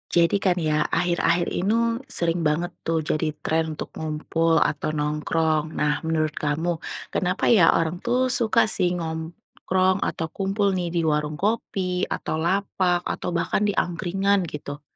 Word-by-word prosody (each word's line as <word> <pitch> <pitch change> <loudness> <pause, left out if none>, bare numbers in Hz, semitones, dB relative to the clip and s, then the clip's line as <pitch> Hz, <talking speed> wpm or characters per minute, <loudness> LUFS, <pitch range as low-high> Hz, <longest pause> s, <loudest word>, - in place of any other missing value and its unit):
Jadi 170 +2 +4
kan 180 -2 +2
ya, 155 -2 +1
akhir-akhir 175 0 +1
inu 200 +5 +1 0.4
sering 170 0 +1
banget 170 +4 0
tuh 165 0 0
jadi 155 0 -1
tren 160 +1 +1 0.2
untuk - - -5
ngumpul 160 +1 0
atau 150 +1 0
nongkrong. 155 +1 0
Nah, 150 +2 0
menurut 155 -1 0
kamu, 150 +3 -1 0.4
kenapa 185 +1 0
ya 190 -8 +6
orang 165 +1 -1
tuh 250 +2 +2
suka 235 -4 +2
sih 180 -4 +1
nongkrong 170 +3 -1
atau 160 - -2
kumpul 200 +1 0
nih 180 -1 -1
di - - +2
warung 150 -1 0
kopi, 190 -3 -1
atau - - -2
lapak, 180 +1 +1
atau - - -3
bahkan 170 +4 0
di 205 - +2
angkringan 195 +2 0
gitu? 145 0 -7
170 Hz, 150 wpm, -24 LUFS, 155-185 Hz, 0.4 s, ya